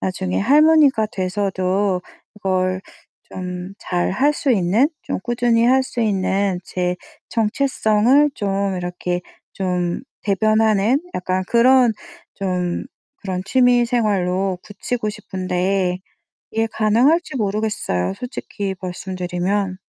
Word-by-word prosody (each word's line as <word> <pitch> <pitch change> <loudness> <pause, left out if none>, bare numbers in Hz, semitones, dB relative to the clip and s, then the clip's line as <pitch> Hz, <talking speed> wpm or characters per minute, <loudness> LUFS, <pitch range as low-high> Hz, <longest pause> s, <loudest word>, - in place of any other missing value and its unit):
나중에 185 0 -2
할머니가 285 -1 +5
돼서도 190 0 0 0.4
이걸 185 -2 0 0.5
좀 180 +1 -6
잘 175 0 -1
할 275 +10 +2
수 290 -2 -1
있는 215 - +3
좀 - - -3
꾸준히 235 0 +2
할 265 +1 +4
수 255 -2 -5
있는 195 -3 +1
제 180 -1 -2 0.3
정체성을 240 +3 +2
좀 195 -1 -1
이렇게 180 0 -3 0.3
좀 180 -1 -1 0.2
대변하는 215 - +2
약간 185 +1 -1
그런 245 +1 +5 0.4
좀 180 -3 -2 0.3
그런 185 -2 -4
취미 245 +1 +4
생활로 195 -6 0
굳히고 215 +2 -3
싶은데 185 -2 -1 0.5
이게 225 +1 0
가능할지 245 +10 +2
모르겠어요 205 - -1
솔직히 205 -5 -5
말씀 185 0 -6
드리면. 185 +2 -1
200 Hz, 230 characters per minute, -20 LUFS, 185-235 Hz, 0.5 s, 할머니가